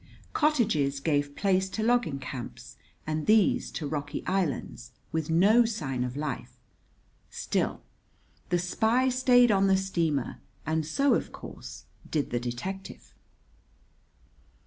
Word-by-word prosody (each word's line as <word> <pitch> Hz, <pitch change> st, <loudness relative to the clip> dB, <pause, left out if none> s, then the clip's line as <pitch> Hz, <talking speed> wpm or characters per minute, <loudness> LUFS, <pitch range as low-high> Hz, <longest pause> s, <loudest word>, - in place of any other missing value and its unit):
Cottages 215 Hz, -, +2 dB
gave 145 Hz, -1 st, 0 dB
place 190 Hz, -1 st, +1 dB
to 215 Hz, -, -3 dB
logging 235 Hz, -, +2 dB
camps 125 Hz, -1 st, -8 dB, 0.3 s
and 155 Hz, 0 st, -2 dB
these 215 Hz, -2 st, +4 dB
to 155 Hz, -, -4 dB
rocky 145 Hz, 0 st, -4 dB
islands, 150 Hz, -9 st, -2 dB, 0.2 s
with 160 Hz, -1 st, -2 dB
no 200 Hz, +9 st, +5 dB
sign 150 Hz, -, -2 dB
of 125 Hz, +2 st, -4 dB
life; 150 Hz, -2 st, -4 dB, 0.7 s
still, -, -, -2 dB, 0.7 s
the 175 Hz, -, +2 dB
spy 225 Hz, +8 st, +2 dB
stayed 245 Hz, -2 st, +5 dB
on 195 Hz, -1 st, +3 dB
the 190 Hz, 0 st, +4 dB
steamer, 165 Hz, -8 st, -1 dB, 0.3 s
and 155 Hz, 0 st, -1 dB
so, 275 Hz, -, +3 dB
of -, -, -1 dB
course, -, -, -10 dB, 0.2 s
did 150 Hz, -3 st, -1 dB
the 120 Hz, -, 0 dB
detective. 125 Hz, +12 st, -6 dB
165 Hz, 125 wpm, -28 LUFS, 145-215 Hz, 0.7 s, no